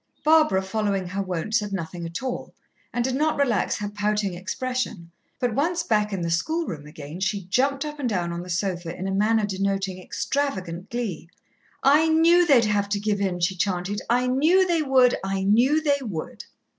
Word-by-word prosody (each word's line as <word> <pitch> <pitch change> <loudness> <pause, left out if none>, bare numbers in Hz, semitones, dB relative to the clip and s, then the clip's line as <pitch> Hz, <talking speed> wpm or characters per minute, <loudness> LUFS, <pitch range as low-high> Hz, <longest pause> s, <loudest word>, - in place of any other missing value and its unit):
Barbara, 310 -11 +4
following 195 -1 -1
her 195 +2 -2
wont, 185 +2 -4
said 210 -3 +1
nothing 170 -2 -4
at 170 +9 -6
all, 255 -2 -5 0.4
and 240 - -1
did 260 +1 -1
not 305 +4 +1
relax 245 -9 +1
her 205 - -3
pouting 205 -1 -1
expression, 195 -1 -4 0.3
but 245 -3 0
once 330 +7 0
back 210 -1 +1
in 195 -3 -3
the 170 0 -2
schoolroom 170 - -2
again, 150 +1 -9
she 195 0 -1
jumped 275 +8 +1
up 300 0 -6
and 255 -4 -1
down 175 -5 -1
on 170 - -4
the 180 - -9
sofa 175 -1 -2
in 190 - -4
a - - -2
manner 215 +2 +2
denoting 195 -1 -2
extravagant 185 -9 -3
glee. 220 -9 -4 0.5
"I 295 +4 +5
knew 335 +2 +5
they'd 255 -7 +5
have 205 -1 0
to 200 0 0
give 205 -1 -1
in," 180 -3 -1
she 185 +3 +1
chanted. 185 +2 -1
"I 245 +2 +3
knew 310 +9 +4
they 340 -3 +1
would, 260 -4 +4
I 195 0 -1
knew 240 +10 +4
they 285 -2 +2
would." 190 -11 -6
205 Hz, 190 wpm, -24 LUFS, 185-265 Hz, 0.5 s, I